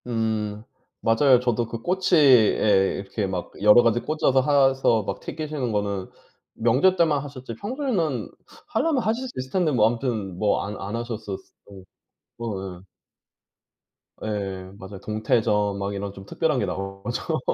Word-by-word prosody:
음 110 -2 -2 0.4
맞아요. 125 +3 +4
저도 120 -2 0
그 115 0 -6
꼬치에 130 - +4
이렇게 100 +1 -3
막 90 -2 -4
여러 105 +3 +7
가지 115 0 +3
꽂아서 150 -2 +1
해서 135 -5 +3
막 - - -4
튀기시는 150 -6 -4
거는 100 -2 -2 0.4
명절 130 +12 +3
때만 155 -6 +2
하셨지 130 -5 -8
평소에는 200 - -2 0.4
하려면 310 -6 +1
하실 230 +4 -1
수 - - -8
있을 130 0 -6
텐데 175 -3 +1
뭐 110 -5 +4
아무튼 115 -6 -2
뭐 105 -1 +2
안 105 +1 -5
안 100 +3 -4
하셨었 110 -4 -5 0.3
음. 95 -2 -12 0.6
어 95 -5 -5
예. 95 - -24 1.4
예 95 -3 -4
맞아요. 95 0 -9
동태전 105 -1 0
막 100 +1 -3
이런 100 0 -4
좀 95 -1 -11
특별한 155 - 0
게 105 - 0
나오죠. 95 +1 -3
115 Hz, 280 characters per minute, -24 LUFS, 100-140 Hz, 1.4 s, 여러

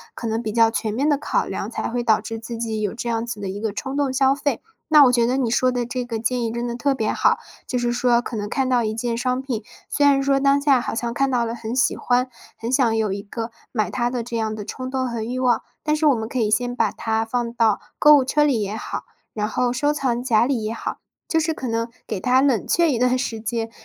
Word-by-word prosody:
可 235 - -5
能 225 +1 -1
比 220 -2 -3
较 225 0 +4
全 220 -2 -2
面 270 +6 0
的 290 - +3
考 295 - 0
量， - - -4
才 - - -3
会 240 +1 -2
导 220 -2 +3
致 225 - -5
自 230 +1 -6
己 225 -1 -2
有 205 -2 -1
这 235 +1 -4
样 230 0 -1
子 235 -3 -5
的 195 - -3
一 195 +2 -5
个 220 0 -2
冲 265 +5 -4
动 285 -2 +1
消 265 0 +4
费。 285 -3 -1 0.3
那 300 -2 +9
我 250 - +5
觉 235 -1 +3
得 255 +2 +1
你 250 -4 0
说 255 +2 +3
的 245 -1 -1
这 250 +1 -3
个 240 -2 -4
建 240 +2 0
议 225 - -1
真 235 +1 -3
的 235 - -3
特 275 +3 +1
别 220 -4 -1
好， - - +3 0.3
就 250 - -1
是 240 0 0
说 240 -1 +3
可 240 - -5
能 205 -1 -3
看 265 +3 0
到 250 -2 +2
一 215 -1 -1
件 235 +1 -2
商 250 +1 0
品， 245 -5 -4 0.2
虽 290 - +1
然 280 -1 +5
说 275 0 +2
当 275 +1 +4
下 280 -3 +3
好 - - -4
像 235 0 -2
看 275 +2 +1
到 245 -2 +1
了 230 - -3
很 230 0 -5
喜 255 - +2
欢， 250 +1 +1 0.3
很 230 +2 -4
想 250 -4 +3
有 215 -3 0
一 200 - -4
个 225 +3 -6 0.2
买 215 -4 -1
它 240 -1 0
的 245 -1 -3
这 235 0 -6
样 220 -1 -1
的 210 -1 -6
冲 255 +4 -5
动 260 -1 -1
和 235 -2 -3
欲 240 +3 -3
望。 255 -2 +2 0.2
但 305 0 +1
是 310 0 +2
我 280 - +5
们 220 -1 -3
可 255 - -3
以 215 -2 +1
先 245 +3 0
把 225 -4 +1
它 220 0 -1
放 235 +1 -2
到 225 -3 +2 0.2
购 300 0 +8
物 265 - +1
车 295 +3 +2
里 270 -7 +2
也 205 +1 -4
好， - - -5 0.3
然 210 -1 -1
后 245 +3 0
收 290 +4 +1
藏 250 -5 -1
夹 235 -2 +3
里 255 -5 -1
也 215 +1 -2
好， - - -4 0.3
就 325 - +2
是 320 0 0
可 265 - -5
能 230 0 -2 0.2
给 - - -3
它 255 +6 +3
冷 270 -6 +2
却 340 -2 +3
一 250 - 0
段 250 +1 +2
时 235 -3 -2
间， 225 +1 -3
240 Hz, 300 characters per minute, -22 LUFS, 225-260 Hz, 0.3 s, 那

